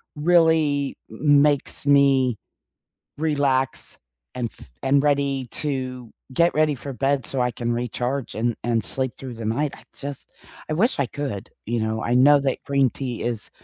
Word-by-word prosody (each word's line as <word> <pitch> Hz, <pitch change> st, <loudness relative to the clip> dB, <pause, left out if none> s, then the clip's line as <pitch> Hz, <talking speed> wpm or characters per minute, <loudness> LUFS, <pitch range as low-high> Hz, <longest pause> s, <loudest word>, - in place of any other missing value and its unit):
really 155 Hz, -3 st, +3 dB
m 140 Hz, +5 st, +3 dB
makes 145 Hz, -1 st, +1 dB
me 135 Hz, -4 st, +4 dB, 0.8 s
relax 140 Hz, -4 st, 0 dB, 0.4 s
and 120 Hz, -3 st, -2 dB
f -, -, -14 dB
and 140 Hz, +1 st, +4 dB
ready 140 Hz, -3 st, +1 dB
to 130 Hz, -5 st, -4 dB, 0.2 s
get 170 Hz, +5 st, +3 dB
ready 155 Hz, -1 st, +3 dB
for 140 Hz, +2 st, -7 dB
bed 135 Hz, -1 st, 0 dB
so 135 Hz, -, -2 dB
I 125 Hz, 0 st, +1 dB
can 120 Hz, +1 st, -3 dB
recharge 125 Hz, +2 st, -2 dB
and 115 Hz, +1 st, 0 dB
and 115 Hz, -1 st, 0 dB
sleep 130 Hz, -2 st, -1 dB
through 130 Hz, -3 st, -7 dB
the 115 Hz, -1 st, -6 dB
night. 140 Hz, +6 st, 0 dB
I -, -, -17 dB
just 140 Hz, -1 st, -7 dB, 0.4 s
I -, -, 0 dB
wish 205 Hz, -, +1 dB
I 140 Hz, -, +2 dB
could, 125 Hz, -7 st, -5 dB, 0.2 s
you 120 Hz, +1 st, -1 dB
know, 110 Hz, 0 st, -2 dB
I 120 Hz, -, 0 dB
know 145 Hz, +3 st, +6 dB
that 135 Hz, -2 st, -2 dB
green 140 Hz, -2 st, +3 dB
tea 125 Hz, -1 st, -5 dB
is 115 Hz, -3 st, -3 dB
135 Hz, 165 wpm, -23 LUFS, 120-145 Hz, 0.8 s, know